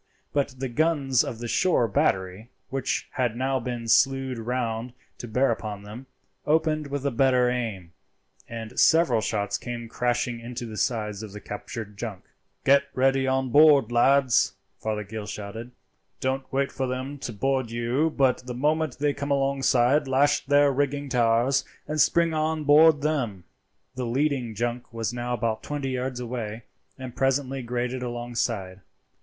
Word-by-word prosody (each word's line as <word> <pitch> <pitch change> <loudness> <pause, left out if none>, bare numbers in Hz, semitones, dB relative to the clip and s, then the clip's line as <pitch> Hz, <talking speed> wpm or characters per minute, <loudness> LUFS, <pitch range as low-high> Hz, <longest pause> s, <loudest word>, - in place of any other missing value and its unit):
But 140 -3 0
the 135 +1 -3
guns 140 -1 +2
of 115 - -5
the 120 +1 -5
shore 125 -2 +2
battery, 95 +2 0 0.2
which 135 -1 -2
had 120 -3 -1
now 130 +2 0
been 120 -1 -5
slewed 135 +1 +2
round 120 0 -3 0.3
to 120 - -6
bear 125 +3 +2
upon 105 -3 -5
them, 110 +6 -10 0.4
opened 155 -1 +1
with 140 0 -4
a 140 - +1
better 125 0 +3
aim, 105 -9 -4 0.6
and 115 +1 -6
several 160 -9 +4
shots 100 -1 -1
came 120 -1 -6
crashing 120 0 -1
into 120 +1 -6
the 110 -2 -7
sides 105 -1 -1
of 105 -3 -8
the 105 - -7
captured 105 0 -7
junk. 110 -6 -5 0.4
"Get 140 +1 +5
ready 135 +1 +2
to 130 0 +2
board, 140 -2 +5
lads!" 130 +1 +4 0.3
Fothergill 105 -1 -4
shouted. 105 +3 -7 0.5
"Don't 130 0 -2
wait 135 +1 0
for 130 - -2
them 130 +3 -4
to 125 - -5
board 130 +2 -1
you, 120 +7 0
but 130 -4 +1
the 125 - -4
moment 150 +1 0
they 145 +1 +1
come 140 +1 -5
alongside 135 -1 +2
lash 140 +2 +3
their 145 0 +5
rigging 140 +1 -1
to 125 - 0
ours 120 +3 +3 0.2
and 155 0 +1
spring 170 -1 +3
on 155 0 0
board 150 +1 +6
them." 125 - -1 0.5
The 125 -1 -4
leading 130 -2 0
junk 120 +3 -3
was 115 0 -3
now 120 0 -2
about 110 -1 -2
twenty 145 -2 -4
yards 130 0 -3
away, 115 -2 -5 0.3
and 130 -2 -8
presently 135 0 0
grated 125 +1 -3
alongside. 120 -6 -3
125 Hz, 160 wpm, -26 LUFS, 115-140 Hz, 0.6 s, board